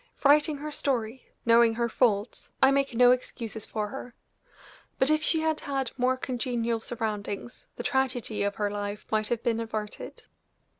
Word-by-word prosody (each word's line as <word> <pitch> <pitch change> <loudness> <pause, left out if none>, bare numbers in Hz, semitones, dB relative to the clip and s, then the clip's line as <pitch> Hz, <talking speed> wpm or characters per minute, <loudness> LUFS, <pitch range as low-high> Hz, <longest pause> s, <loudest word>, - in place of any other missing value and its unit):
Writing 295 +1 +5
her 300 +2 -6
story, 250 -4 -2 0.2
knowing 230 -1 +5
her 235 0 +1
faults, 220 -2 0
I 265 - +6
make 275 -2 +1
no 245 +1 +7
excuses 230 -3 -3
for 210 -1 -3
her; 245 0 -8 0.8
but 270 +3 +3
if 310 0 +3
she 315 +1 +1
had 315 -1 0
had 270 -3 -2
more 255 0 +1
congenial 240 -2 -1
surroundings 220 -1 -4
the - - -6
tragedy 255 -5 0
of 200 0 0
her 205 -1 -1
life 205 0 -4
might 215 -1 +1
have 235 0 -2
been 230 -1 +1
averted. 215 -2 -5
240 Hz, 160 wpm, -28 LUFS, 220-265 Hz, 0.8 s, no